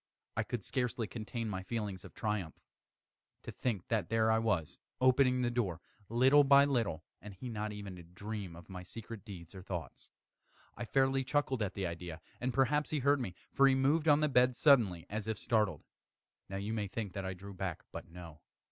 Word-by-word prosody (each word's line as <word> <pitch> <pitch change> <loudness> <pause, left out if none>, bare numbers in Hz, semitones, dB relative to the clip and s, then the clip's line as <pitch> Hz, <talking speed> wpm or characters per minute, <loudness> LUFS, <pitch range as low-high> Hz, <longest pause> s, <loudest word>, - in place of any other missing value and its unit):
I 110 - +1
could 110 -1 -4
scarcely 125 -2 -1
contain 115 +1 -4
my 95 -3 -3
feelings 100 -1 -4
of - - -12
triumph. 105 -7 -2 0.8
To - - -6
think 110 -8 -2
that 110 -6 0
there 110 0 +3
I 110 - +4
was, 100 -9 0 0.2
opening 130 0 +4
the 120 - +1
door, 100 -9 -1 0.3
little 130 +5 +6
by 140 0 +7
little, 115 - 0 0.2
and 105 -2 -9
he 125 +7 -6
not 105 -2 -3
even 100 -3 -7
to - - -9
dream 95 +1 -6
of 85 - -12
my 90 -2 -7
secret 110 +3 -8
deeds 90 -5 -10
or 95 - -8
thoughts. 85 -7 -6 0.7
I 120 - -4
fairly 135 +2 +2
chuckled 130 -2 0
at 105 - -1
the 100 - -2
idea; 85 -1 -5 0.2
and 125 +1 -1
perhaps 140 +3 +2
he 155 - 0
heard 140 +1 +3
me; 95 -8 -4 0.2
for 140 - +6
he 135 - +5
moved 145 +4 +2
on 145 0 +6
the 150 - +4
bed 125 -2 +4
suddenly, 110 - +4
as 110 +1 -4
if 110 -2 -1
startled. 105 -9 +1 0.7
Now 95 - -3
you 100 +3 -3
may 105 -2 -1
think 100 -1 -4
that 100 - -4
I 95 0 -3
drew 100 +2 -9
back 95 -3 -4
but - - -8
no. 85 -2 -11
110 Hz, 200 wpm, -34 LUFS, 95-125 Hz, 0.8 s, by